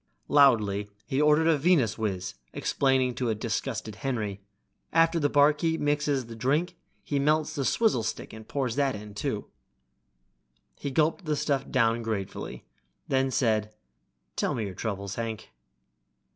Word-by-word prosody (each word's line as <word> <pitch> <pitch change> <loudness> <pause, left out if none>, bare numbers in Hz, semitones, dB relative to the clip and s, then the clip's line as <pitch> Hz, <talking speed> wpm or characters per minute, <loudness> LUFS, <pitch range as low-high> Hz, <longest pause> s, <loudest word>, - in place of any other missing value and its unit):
Loudly 105 -8 +4 0.2
he 135 +2 0
ordered 150 +1 +4
a 160 -3 +3
Venuswiz, 110 - +1 0.2
explaining 130 -2 +1
to 125 -1 -2
a 110 - +1
disgusted 110 -1 -3
Henry, 105 -6 -3 0.5
"After 165 +1 +4
the 145 -2 +2
barkeep 150 +3 +3
mixes 145 -3 0
the 115 0 -9
drink 150 +10 0 0.3
he 145 - -1
melts 155 +2 +2
the 140 - -2
swizzle 215 - +2
stick 110 - -4
and 110 0 -10
pours 130 -5 -2
that 140 -3 +2
in, 105 0 -9
too." 105 - -3 1.3
He 140 - -3
gulped 160 +6 +1
the 155 -1 0
stuff 140 -2 -1
down 115 -2 +2
gratefully, 110 -4 -4 0.4
then 135 0 +2
said, 110 -4 0 0.6
"Tell - - 0
me 110 - -2
your 95 - -5
troubles, 100 -1 -4
Hank." 115 -1 -5
130 Hz, 145 wpm, -28 LUFS, 110-145 Hz, 1.3 s, Loudly